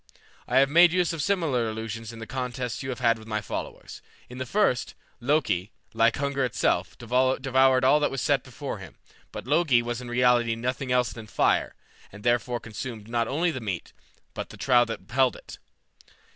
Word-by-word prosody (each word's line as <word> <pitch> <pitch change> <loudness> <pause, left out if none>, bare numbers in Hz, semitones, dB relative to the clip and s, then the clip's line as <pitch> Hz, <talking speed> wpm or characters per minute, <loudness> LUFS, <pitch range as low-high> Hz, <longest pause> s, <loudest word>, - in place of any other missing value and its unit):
I - - +1
have 135 +1 +6
made 170 +2 +7
use 180 -1 +1
of 165 - -3
similar 150 - 0
illusions 110 0 -5
in 115 - -11
the 110 - -7
contests 125 0 -4
you 130 - -5
have 130 0 -5
had 115 -2 +3
with 110 - -13
my 110 -1 -1
followers. 105 - -7 0.3
In 125 +1 -9
the 130 - -4
first, 195 - +1 0.2
Loki, 120 - 0 0.2
like 115 0 +3
hunger 140 -1 -1
itself, 125 -4 0
devoured 130 +2 +2
all 145 +3 +5
that 150 - +1
was 135 - -4
set - - +2
before - - -7
him, - - -11 0.4
but - - -7
Logi 140 -4 +3
was 120 0 -4
in 125 - -8
reality 120 -1 +3
nothing 125 +3 -3
else 125 -3 +2
than 110 -1 -10
Fire, - - +1 0.4
and 105 +1 -12
therefore 120 0 +1
consumed 110 0 -7
not 115 -1 0
only 165 +5 +1
the 130 -5 -5
meat, 95 -6 -5 0.4
but - - -6
the - - -12
trough 120 -3 +3
which 115 - -4
held 130 +1 +2
it. - - -12
125 Hz, 190 wpm, -26 LUFS, 115-135 Hz, 0.4 s, made